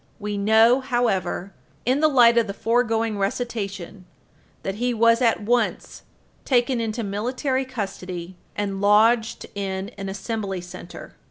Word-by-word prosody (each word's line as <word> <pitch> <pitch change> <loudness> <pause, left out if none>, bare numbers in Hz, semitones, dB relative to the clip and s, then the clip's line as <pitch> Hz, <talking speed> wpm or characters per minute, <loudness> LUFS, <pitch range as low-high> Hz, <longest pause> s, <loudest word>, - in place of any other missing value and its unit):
We 210 -1 -3
know, 220 +5 +5
however, 230 -7 -1 0.3
in 255 +4 +2
the 310 - +5
light 240 -5 +6
of 225 - 0
the 200 - -5
foregoing 225 -2 0
recitation, 200 -4 -4 0.6
that 195 - -2
he 245 -1 +1
was 230 +1 +4
at 230 -3 +2
once 240 +3 -1 0.4
taken 245 -1 +1
into 225 +1 -3
military 255 +6 -1
custody 190 -7 -6 0.2
and 200 -1 -3
lodged 225 +3 +3
in 195 -1 -4
an 195 0 -4
Assembly 195 -1 -4
Center. 175 0 -10
220 Hz, 135 wpm, -23 LUFS, 195-240 Hz, 0.6 s, light